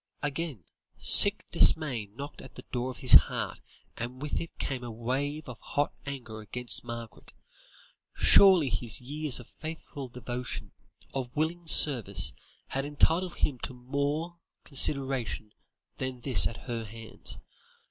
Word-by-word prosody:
Again, 145 - -4 0.3
sick - - +7
dismay 130 -10 +3
knocked 140 +8 -10
at - - -14
the - - -11
door 125 0 -3
of 125 - -8
his 125 - +7
heart, 75 - +4 0.4
and 120 +2 -6
with 150 +1 -3
it 165 - -10
came 130 -3 -4
a 120 - -6
wave 135 +7 -4
of 125 -3 -9
hot 145 0 -2
anger 120 -6 -7
against 120 +3 -3
Margaret. 115 -2 -9 0.8
Surely 185 -8 +6
his 110 +1 +1
years 145 +2 0
of 125 - -15
faithful 155 -4 -8
devotion, 125 0 -6 0.4
of 130 -1 -5
willing 165 +3 -2
service, 100 - +3 0.4
had 135 - -2
entitled 165 +5 +1
him 130 -4 -1
to 130 - -4
more 145 +7 -3 0.2
consideration 130 -6 +1 0.5
than 130 -1 -5
this 110 - +5
at 115 - -10
her 115 -2 -4
hands. 115 +1 -4
130 Hz, 135 wpm, -28 LUFS, 120-145 Hz, 0.8 s, sick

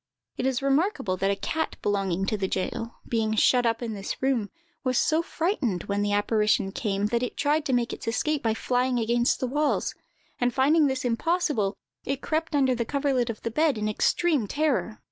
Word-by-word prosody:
It 255 - -1
is 265 0 -1
remarkable 275 - +1
that 195 +2 +1
a 200 - +2
cat 320 +10 -2
belonging 195 -2 0
to 215 - 0
the 195 -2 -1
jail, 230 +5 -3
being 220 -2 0
shut 245 +2 +4
up 230 +1 0
in 225 -2 -3
this 195 -1 -5
room, 255 -6 0 0.3
was 255 -2 +1
so 315 +1 +3
frightened 320 - -1
when 200 0 -1
the 205 0 0
apparition 210 -1 +2
came, 200 -1 -1
that 235 - +2
it 250 - -3
tried 300 +1 +1
to 265 - 0
make 240 -1 +1
its - - -8
escape 295 +6 0
by 225 -1 0
flying 250 +1 0
against 235 +1 +1
the - - -1
walls; 295 +4 0 0.5
and 245 -1 +1
finding 290 +3 +4
this 265 -1 -2
impossible, 245 - 0 0.3
it 275 0 -2
crept 315 +1 -2
under 265 -2 +3
the 235 -1 -1
coverlet 270 -2 0
of 225 - -6
the 230 - -2
bed, 300 0 +2
in 210 0 -1
extreme 275 +4 +1
terror. 285 -5 0
245 Hz, 200 wpm, -26 LUFS, 215-285 Hz, 0.5 s, shut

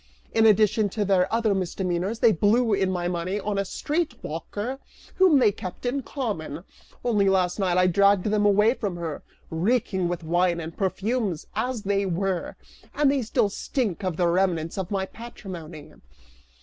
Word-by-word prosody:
In 225 0 +5
addition 215 0 +4
to 210 +1 -2
their 190 -2 +2
other 225 -2 +2
misdemeanors, 185 +2 -2
they 230 - +6
blew 215 +5 +2
in 195 -1 +1
my 175 -2 -1
money 180 +3 -2
on 205 -1 -2
a - - +1
street 300 - -2
walker 205 - -5 0.4
whom 370 -6 +6
they 245 -6 +5
kept 185 +3 -8
in 265 +3 0
common; 200 - -4 0.4
only 205 -5 +3
last 185 0 +1
night 185 -2 +1
I 180 - +5
dragged 200 +1 +4
them 210 0 +1
away 210 +3 +4
from 205 -8 -4
her, 165 -3 -5 0.3
reeking 190 +1 0
with 175 -1 -3
wine 175 +1 +1
and 160 0 -7
perfumes, 195 -2 -1
as 250 -4 -2
they 200 -1 0
were, 185 0 -2 0.4
and 290 -2 +3
they 280 -1 +1
still 215 -2 +1
stink 210 - -2
of 185 -4 -2
the 175 - +2
remnants 170 -2 +1
of 190 -2 -4
my 195 -2 -1
patrimony!" 180 -9 -9
195 Hz, 170 wpm, -25 LUFS, 175-220 Hz, 0.4 s, they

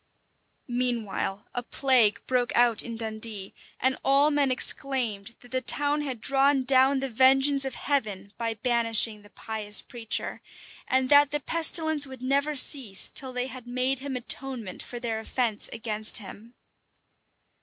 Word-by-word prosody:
Meanwhile, 235 -5 -2
a 245 - -3
plague 245 -4 +2
broke 250 -1 -1
out 240 -2 +3
in 230 -1 -7
Dundee; 220 -3 -5 0.3
and 260 0 0
all 280 +2 +3
men 290 -2 +1
exclaimed, 245 -5 -2
that 245 - -18
the 260 0 -2
town 290 +3 +1
had 265 -5 -5
drawn 275 +2 +1
down 265 +1 +2
the 270 - -2
vengeance 270 +3 +4
of 265 - -5
Heaven 210 -8 -3
by 230 -1 -4
banishing 225 -1 +1
the 205 - -17
pious 215 -1 0
preacher, 230 -3 -4 0.5
and 260 0 +1
that 285 0 +5
the 295 +1 -2
pestilence 315 -1 +1
would 260 -2 -12
never 280 +3 -1
cease, 255 -8 +4
till 265 -2 0
they 250 0 -3
bed 255 -1 -11
made 255 +2 -1
him 275 0 -6
atonement 250 -5 -1
for 240 - -8
their 230 -2 -4
offence 225 -1 0
against 220 -2 0
him. 220 +3 -11
250 Hz, 150 wpm, -25 LUFS, 225-270 Hz, 0.5 s, that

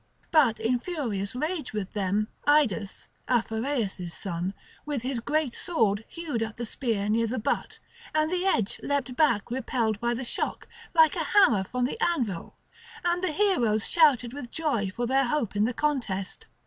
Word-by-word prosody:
But 275 -9 +4
in 245 +2 +1
furious 240 - -3
rage 310 0 -2
with 205 -3 -4
them 205 +1 0 0.2
Idas, 250 -10 +2 0.2
Aphareus' 225 -6 -1
son, 180 +1 -4 0.3
with 290 -5 -3
his 255 -1 -1
great 290 +1 0
sword 225 - 0
hewed 320 -9 -4
at 225 -1 -3
the 235 - -3
spear 220 -4 -1
near 225 +2 +2
the 250 +4 -2
butt, 220 - -2 0.3
and 310 +1 +1
the 365 0 0
edge 225 - +1
leapt 275 -3 -1
back 235 -9 +2
repelled 235 -4 -1
by 240 +1 0
the 250 +2 -4
shock, - - -3 0.3
like 320 -2 +6
a - - 0
hammer 230 - +6
from 250 +5 -1
the 450 - -4
anvil; 235 - -1 0.5
and 350 +1 +1
the 370 - +1
heroes 245 - +2
shouted 270 -8 +4
with 270 -4 -7
joy 275 -12 -1
for 240 +6 -3
their 265 +2 +2
hope 240 -6 -1
in 205 +1 +3
the 240 - 0
contest. 230 -10 -2
240 Hz, 170 wpm, -27 LUFS, 215-300 Hz, 0.5 s, like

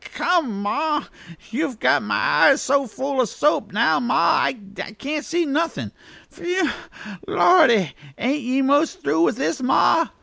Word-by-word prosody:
Come, 275 - 0
ma! 295 +8 -1 0.5
you've 270 0 -3
got - - +2
my - - -2
eyes - - +4
so 275 0 +1
full 265 +4 -2
o' - - +1
soap 225 -3 -1
now, 230 +5 +2
ma, 245 0 +2 0.2
that 195 -1 -6
I - - -10
can't 285 +7 -4
see 335 +3 -1
nothin'. 315 +4 -2 0.4
Phew, 360 +2 -2 0.6
Lordy! 235 - +4 0.2
ain't 275 +5 -1
ye 260 +2 0
most 285 +4 +1
through 155 +3 +1
with 170 - +2
this, 270 +1 -2
ma?" 300 +5 +3
275 Hz, 155 wpm, -21 LUFS, 230-310 Hz, 0.6 s, eyes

